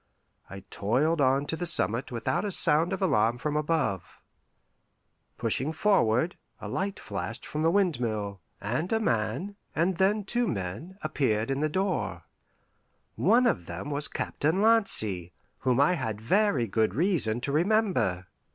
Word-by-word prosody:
I 100 0 -9
toiled 145 +10 +1
on 135 +1 +2
to 160 - -3
the 175 +1 -1
summit 115 - +2
without 125 - -1
a 205 - -2
sound 160 0 +4
of 195 0 -2
alarm 115 - +2
from 150 +4 -3
above. 150 - -1 1.2
Pushing 140 +5 -1
forward, 160 - +2 0.2
a - - -7
light 200 +1 -3
flashed 100 +2 -6
from 150 - -4
the 165 - +3
windmill, 115 - -1 0.2
and 125 - -3
a 225 - +2
man, 120 - -2 0.2
and 170 +3 +1
then 205 +3 +2
two 240 +4 -1
men, 110 - -5
appeared 130 -7 0
in 135 - -1
the 155 - +1
open 155 - -10
door. 190 0 -1 0.9
One 250 +2 +3
of 85 - 0
them 90 +12 -6
was 145 +1 0
Captain 160 +6 -1
Lancy, 110 - +2 0.3
whom 125 -1 +1
I 145 +5 +4
had 110 - -3
very 185 - +2
good 110 +1 0
reason 150 - +1
to 140 - -1
remember. 175 - +1
150 Hz, 150 wpm, -27 LUFS, -, 1.2 s, sound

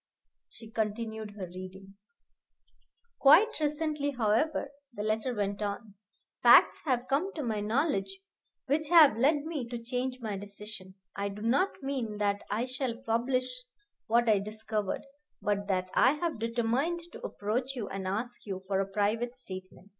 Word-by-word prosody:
She 225 -1 -13
continued 220 -1 -3
her 190 - -4
reading. 185 +2 -10 1.3
Quite 335 +11 +6
recently, 300 -1 0
however, 265 +4 +1 0.2
(the 210 -3 -5
letter 215 +3 0
went 205 -2 -2
on) 205 +1 -4 0.5
facts - - +7
have 255 -3 0
come 305 +9 +1
to 305 - -3
my 220 -4 -1
knowledge 205 -4 0 0.5
which 295 +2 0
have 320 -9 +8
led 285 +5 +3
me 300 -7 -3
to 240 - -3
change 250 +2 -3
my 220 -4 -3
decision. 200 -1 -9 0.2
I 200 0 -2
do 205 +2 -8
not 275 - +1
mean 255 -6 -2
that 205 -1 0
I 220 +4 0
shall 255 -2 -3
publish 255 +1 0 0.6
what 235 +1 +3
I 215 -3 +5
discovered, 215 0 -3 0.3
but 205 -1 -1
that 185 -2 -1
I 260 - +5
have 315 -3 -2
determined 240 +9 0
to - - -10
approach 245 +6 -2
you 225 -5 -4
and 190 -1 -4
ask 235 +6 -3
you 190 -1 -4
for 190 0 0
a 195 - 0
private 225 +4 0
statement. 185 -5 -9
225 Hz, 155 wpm, -30 LUFS, 205-265 Hz, 1.3 s, have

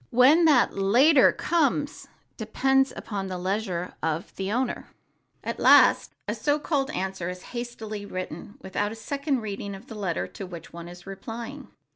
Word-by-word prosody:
When 275 +8 +6
that 285 -7 +4
"later" 255 +9 +5
comes 295 -3 0 0.3
depends 270 0 +2 0.2
on 195 -2 -2
the 185 -1 -4
leisure 185 -1 -2
of 160 +1 -2
the 195 +1 -3
owner. 250 +2 -1 0.6
At - - -4
last - - +6
a - - 0
so 290 -1 +1
called 285 -2 -1
answer 190 - -3
is 180 0 -7
hastily 220 -4 -5
written 185 - -6
without 205 +2 -2
a - - -6
second 280 +3 -2
reading 200 -1 -5
of 195 +4 -12
the 240 - -10
letter 195 -6 -2
to 195 - -8
which 170 -3 -10
one 170 0 -8
is 175 0 -12
replying. 230 +8 -7
215 Hz, 160 wpm, -26 LUFS, 190-270 Hz, 0.6 s, When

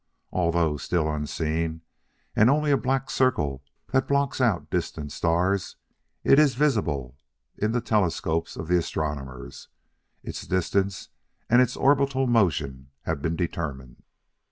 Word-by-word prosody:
Although 85 -3 +1
still 80 +1 0
unseen, 80 +2 -2 0.5
and 110 +3 +5
only 150 +1 +2
a - - +6
black 135 0 -1
circle 75 - +1 0.3
that 130 0 +2
blocks 140 -1 +1
out 110 -8 +1
distant 75 -2 -3
stars, 90 +4 0 0.5
it 135 - +6
is 145 -5 +4
visible 80 - 0 0.4
in 105 +1 0
the 120 +1 0
telescopes 85 -7 0
of 80 - -6
the 90 +1 +3
astronomers; 70 -6 -5 0.6
its - - -7
distance 95 +1 0 0.4
and 120 +1 +7
its 125 -1 +1
orbital 135 -1 +3
motion 70 - +1
have 70 - -2
been 80 +2 -1
determined. 70 -7 -4
90 Hz, 130 wpm, -26 LUFS, 75-125 Hz, 0.6 s, and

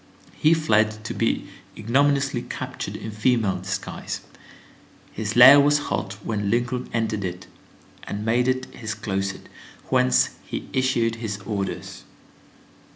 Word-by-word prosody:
He 155 +2 +3
fled, 110 -7 +1
to - - -3
be - - -1 0.3
ignominiously 140 +5 +1
captured - - -5
in 110 - -6
female 110 -2 +1
disguise. 95 +1 -5 0.9
His 110 0 -4
lair 130 +4 +10
was 145 +1 +4
hot 100 0 -2
when 105 -3 -1
Lincoln 120 +2 -1
entered 110 -3 -1
it, 90 0 -5 0.6
and 105 +1 -5
made 120 +2 +2
it 130 0 0
his 110 -3 -5
closet, 95 -2 -3 0.4
whence 65 0 +3
he - - -6
issued 120 -3 +1
his 110 -3 -4
orders. 100 -3 -4
110 Hz, 125 wpm, -24 LUFS, 100-125 Hz, 0.9 s, lair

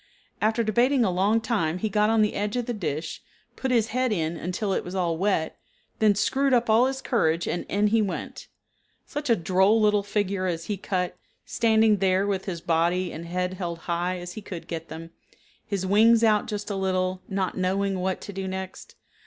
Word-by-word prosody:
After 220 +2 +2
debating 240 +4 +3
a 185 - +1
long 200 +5 +2
time 180 -8 -1
he 220 - -1
got 210 +1 +2
on 225 -1 +4
the 210 - 0
edge 205 +2 -2
of 245 -1 -1
the 240 - -2
dish, 160 -7 -4 0.3
put 265 - -3
his 230 -3 +2
head 255 +1 0
in 165 -4 -1
until 185 +4 -2
it - - -1
was 180 +2 -7
all 175 -3 0
wet, 180 -3 -1 0.4
then 215 -2 +4
screwed 270 +6 +2
up 240 -2 +2
all 235 +4 +5
his 265 0 -4
courage 165 -9 +1
and 175 - -3
in 205 +1 +1
he 220 +2 +3
went. 200 -3 -4 0.6
Such 295 -2 -5
a 230 - +6
droll 190 +5 +3
little 210 -1 +3
figure 200 -2 -1
as 165 -2 -3
he 210 - -2
cut, 185 -2 -2 0.3
standing 220 -2 +3
there 190 0 +2
with 195 -2 -2
his 175 -4 -4
body 175 +1 +1
and 165 +2 -7
head 180 +1 -2
held 175 -3 -4
as - - -20
high 175 +1 -1
as 175 0 -7
he 215 - -7
could 180 -4 -8
get 165 -1 -5
them, 165 +1 -8 0.6
his 200 -3 -2
wings 225 +4 +5
out 215 -2 +3
just 210 0 -4
a - - -2
little, 185 -1 -1
not 190 -2 -1
knowing 190 +1 0
what 185 0 -2
to 200 - -8
do 190 0 -4
next. 190 0 -7
195 Hz, 210 wpm, -25 LUFS, 180-220 Hz, 0.6 s, a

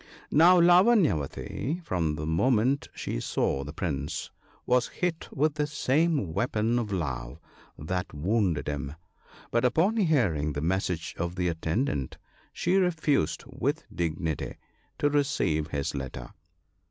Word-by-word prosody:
" - - -23
Now 175 +4 +7
Lavanyavati, 175 - +3
from 80 -5 0
the 75 0 -4
moment 125 - +2
she - - -3
saw 70 +2 -1
the 75 - -7
Prince,, 75 -3 -3 0.3
was 125 -1 +3
hit 175 -2 -3
with 150 +2 +1
the 150 0 -1
same 150 - +1
weapon 115 +2 +1
of 110 -3 -3
love 65 -10 -3 0.4
that 90 +4 -3
wounded 90 +1 0
him; 70 0 -3 0.6
but 115 - +2
upon 165 - +2
hearing 110 - +2
the 70 - -3
message 90 0 -1
of 85 +1 -2
the 90 -1 0
attendant, 80 - -2 0.3
she 180 +2 +1
refused 160 - +1
with - - -2
dignity 80 -2 -2 0.4
to 145 - +2
receive 100 - +1
his 70 -3 -2
letter. 65 -2 -6
95 Hz, 130 wpm, -28 LUFS, -, 0.6 s, Now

